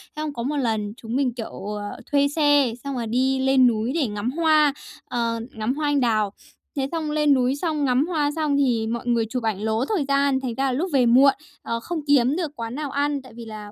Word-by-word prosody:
Xong 305 -1 -4
có 235 - -4
một 290 +4 -2
lần 220 -5 -1
chúng 230 +1 -6
mình, 265 -3 +1
kiểu, 225 -4 -7
ờ, 205 0 -7
thuê 285 -1 +4
xe, 290 -4 +3
xong 280 -2 -4
là 235 - -2
đi 260 +4 +1
lên 265 -1 +4
núi 225 +1 0
để 305 -6 +1
ngắm 210 +3 -3
hoa, 310 -2 +3 0.3
ờ, 230 -1 -2
ngắm 220 +3 -2
hoa 300 0 -1
anh 290 -1 +2
đào. 215 -5 +1 0.4
Thế 270 -1 0
xong 320 -3 -2
lên 300 -1 +3
núi 255 0 +2
xong 305 -1 -1
ngắm 260 +4 +2
hoa 300 -5 0
xong 305 -3 0
thì 240 -5 +1
mọi 235 +1 -4
người 235 -2 +2
chụp 250 0 -3
ảnh 215 -3 -1
lố 220 +3 0
thời 345 -4 -1
gian, 275 -1 +2
thành 255 -3 -4
ra 270 - 0
là 265 - +1
lúc 310 +9 -1
về 260 -3 +4
muộn, 260 +4 +6 0.3
ờ, 230 - -3
không 335 +7 -4
kiếm 275 -1 +4
được 335 -4 -2
quán 230 +1 -5
nào 295 -1 -4
ăn, 285 0 0
tại 260 -3 -15
vì 235 -1 -9
là, 215 -2 -9
265 Hz, 240 wpm, -23 LUFS, 230-290 Hz, 0.4 s, muộn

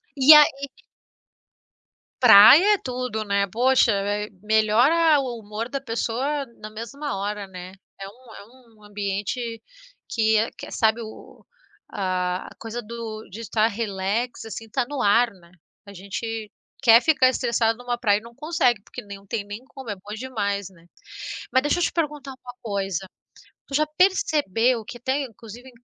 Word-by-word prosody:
E 280 +2 +8
aí 280 -2 +4 1.5
Praia 250 - +8
é - - -4
tudo, 250 - -4
né? 200 -1 +1
Poxa, 250 0 +3
eh, 205 +1 -2
melhora 240 +10 +3
o 250 -4 -4
humor 215 +2 -5
da 275 0 -4
pessoa 270 +4 -2 0.2
na 215 - -7
mesma 235 +4 -6
hora, 205 0 -4
né? 185 0 -10 0.3
É 195 - -7
um 235 +3 -16
é - - -11 0.3
um 210 - -22
ambiente 210 +3 -4 0.5
que 220 -1 +2
é 220 +2 +1
que - - -9
sabe 220 +1 +1
o 220 -1 -12 0.5
a 185 -2 -2
a - - -14
coisa 225 +2 -6
do 225 -1 -8
de 210 +5 -9
estar 220 0 +1
relax, 215 +2 -3
assim, 225 0 -7
está 240 +3 -2
no 285 -2 -4
ar, 230 +3 +4
né? 175 -4 -20 0.3
A 200 - -12
gente 215 +3 -6 0.3
quer 235 -2 +7
ficar 300 -4 +4
estressado 235 -3 0
numa 245 0 -3
praia 210 -4 +2
e - - -21
não 235 +1 -14
consegue, 275 -7 +1
porque - - -9
nem 200 -1 -9
não 195 - -19
tem 215 0 -3
nem 205 +4 -8
como, 265 -3 -11
é 205 - -3
bom 205 +2 -10
demais, 205 -5 -3
né? 170 -3 -21 0.7
Mas 260 +1 +4
deixa 295 +4 +1
eu - - +1
te - - -1
perguntar 300 -4 -3
uma 250 -1 -12
coisa, 195 -4 -3 0.6
tu - - -11
já 305 +2 +3
percebeu 255 - +2
que 240 - -9
tem, 265 +3 -1
inclusive 235 +1 -12
225 Hz, 165 wpm, -23 LUFS, 205-255 Hz, 1.5 s, E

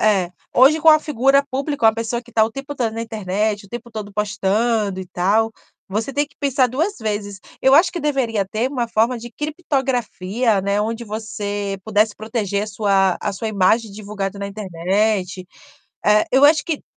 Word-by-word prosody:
É, 195 -5 +2 0.2
hoje, 280 +5 +6
com 325 - +4
a 310 -1 +8
figura 275 -2 +2
pública, 275 -2 0
uma 220 - +5
pessoa 230 +1 -2
que 240 0 -19
tá 220 - +4
o 220 - -3
tempo 275 +4 -7
todo 235 -5 -1
na 225 +1 -4
internet, 210 -1 -2
o - - -21
tempo 240 +2 -8
todo 210 -2 -7
postando 210 0 0
e 185 - -7
tal, 205 +6 +1 0.4
você 215 +7 -2
tem 290 +2 0
que 285 - -28
pensar 275 -2 +2
2 320 - -1
vezes. 205 -2 -3 0.2
Eu 265 - +4
acho 335 +4 +5
que 345 - -4
deveria 260 -8 0
ter 220 +6 -1
uma 245 -4 -2
forma 230 +3 +1
de 240 +1 -9
criptografia, 250 - -1
né, 200 +2 0
onde 225 +2 -3
você 205 -2 -4
pudesse 215 0 +2
proteger 210 -2 -2
a - - -9
sua 195 -3 +2
a 205 - -2
sua 220 +3 -4
imagem 215 +2 +2
divulgada 200 -1 -5
na 200 - -4
internet. 195 0 -1 0.6
Eh, 210 0 +4
eu 265 +2 +5
acho 300 +1 +5
que 320 -4 -3
220 Hz, 185 wpm, -20 LUFS, 205-255 Hz, 0.6 s, a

